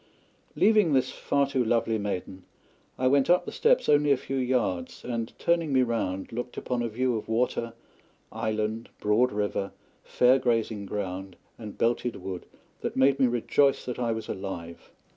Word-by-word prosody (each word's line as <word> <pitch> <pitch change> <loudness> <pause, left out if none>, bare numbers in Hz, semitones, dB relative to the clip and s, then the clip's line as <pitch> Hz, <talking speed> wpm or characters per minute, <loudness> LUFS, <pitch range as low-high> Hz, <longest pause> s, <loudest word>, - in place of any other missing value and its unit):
Leaving 210 -8 +4
this 130 -2 +2
far 140 0 0
too 135 -2 0
lovely 115 -1 +1
maiden, 95 -2 -4 0.6
I 130 - -1
went 135 +2 +3
up 180 +1 +4
the - - -5
steps - - +2
only 145 0 +4
a 140 - +4
few 135 +1 -4
yards, 125 -9 -1
and, 115 -2 -3
turning 170 -3 +1
me 130 -1 +4
round, 95 -6 -2
looked 120 +1 -5
upon 125 -1 -2
a 120 - 0
view 125 +2 0
of 110 - -5
water, 115 0 0 0.6
island, 110 +1 -2
broad 110 +5 +2
river, 105 -1 -2 0.3
fair 125 +2 +4
grazing 115 -5 -1
ground, 95 -1 -4 0.2
and 105 -3 -8
belted 120 +1 0
wood 95 -2 -7 0.3
that - - -4
made 135 +1 +4
me 130 - +5
rejoice 130 +4 +2
that 125 -1 -4
I 120 -2 0
was 110 0 -4
alive. 85 -3 -6
120 Hz, 165 wpm, -27 LUFS, 105-130 Hz, 0.6 s, me